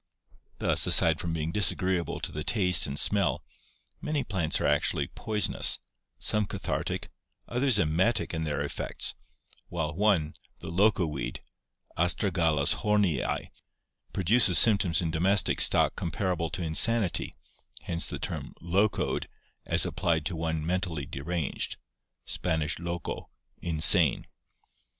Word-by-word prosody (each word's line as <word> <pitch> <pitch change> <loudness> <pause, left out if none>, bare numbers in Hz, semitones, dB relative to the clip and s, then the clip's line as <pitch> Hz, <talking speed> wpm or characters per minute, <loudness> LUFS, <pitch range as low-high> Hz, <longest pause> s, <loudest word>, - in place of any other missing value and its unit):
Thus, - - +1
aside 80 -2 +4
from 85 - -3
being 80 0 -3
disagreeable 90 -2 +1
to - - -3
the 75 - -5
taste 90 -5 +3
and 70 +1 -5
smell, 100 -3 +1 0.6
many 150 -2 -2
plants 90 -7 0
are - - -1
actually - - +1
poisonous, 105 -1 +1 0.4
some 105 -2 0
cathartic, - - -4 0.4
others 125 -1 +3
emetic 95 +7 +1
in 80 - -3
their 75 -2 -2
effects, - - -3 0.6
while 80 -4 -3
one, 90 -4 +1 0.2
the - - -9
loco 95 +1 +2
weed 75 -3 -5 0.6
(Astragalus 85 -5 +1
hornii) 105 -10 0 0.6
produces 95 0 +4
symptoms 100 -6 +4
in 80 - -2
domestic 90 +3 +2
stock - - +4
comparable 85 0 -2
to 95 -1 -4
insanity, 95 +5 0 0.5
hence 85 -1 -2
the - - -5
term - - -6
"locoed" 95 +4 0 0.4
as - - +2
applied 80 -3 -1
to 90 +1 -2
one 80 -1 -3
mentally 85 -4 -2
deranged 75 +2 -3 0.5
(Span, 80 -2 -2
loco, 85 0 -5 0.3
insane). 80 -2 +4
85 Hz, 120 wpm, -28 LUFS, 80-100 Hz, 0.6 s, aside